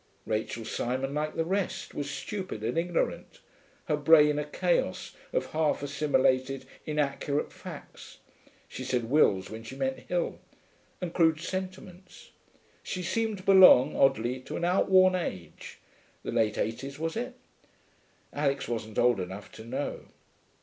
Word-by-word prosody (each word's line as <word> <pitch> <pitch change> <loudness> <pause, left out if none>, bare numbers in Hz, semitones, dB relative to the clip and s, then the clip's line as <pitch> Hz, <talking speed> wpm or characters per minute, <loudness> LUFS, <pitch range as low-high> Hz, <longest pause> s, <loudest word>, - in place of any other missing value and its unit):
Rachel 110 +1 -3
Simon, 130 +4 -2
like 150 +1 -2
the 165 - 0
rest, 190 +2 -2
was 145 -1 -4
stupid 185 - -5
and 115 +2 -1
ignorant, 170 +1 -2 0.5
her 150 - +1
brain 150 0 +5
a - - -1
chaos - - -1 0.2
of - - -2
half 155 -2 +1
assimilated, 135 -2 +1 0.2
inaccurate 145 -1 -1
facts - - -11 0.5
(she 130 - -7
said 125 -2 -2
Wills 100 -11 +3
when 110 +1 -7
she 115 +4 -9
meant 135 -1 -2
Hill) 175 -1 -2 0.6
and 175 -2 -4
crude 160 -2 +3
sentiments. 185 0 -7 0.5
She 180 - -4
seemed 220 +3 -1
to 185 - -11
belong, 185 -8 +7
oddly, 130 -2 +2
to 130 - -6
an 170 - -1
outworn 185 +1 +5
age 95 - -5 0.5
(the - - -4
late 110 -2 +1
eighties, 135 +5 -3
was 165 +1 -3
it? 245 +2 -4 1.0
Alix 140 -2 0
wasn't 110 -2 -4
old 120 -3 +4
enough 95 +3 -6
to 110 - -11
know). 130 +5 -4
145 Hz, 140 wpm, -29 LUFS, 125-175 Hz, 1.0 s, belong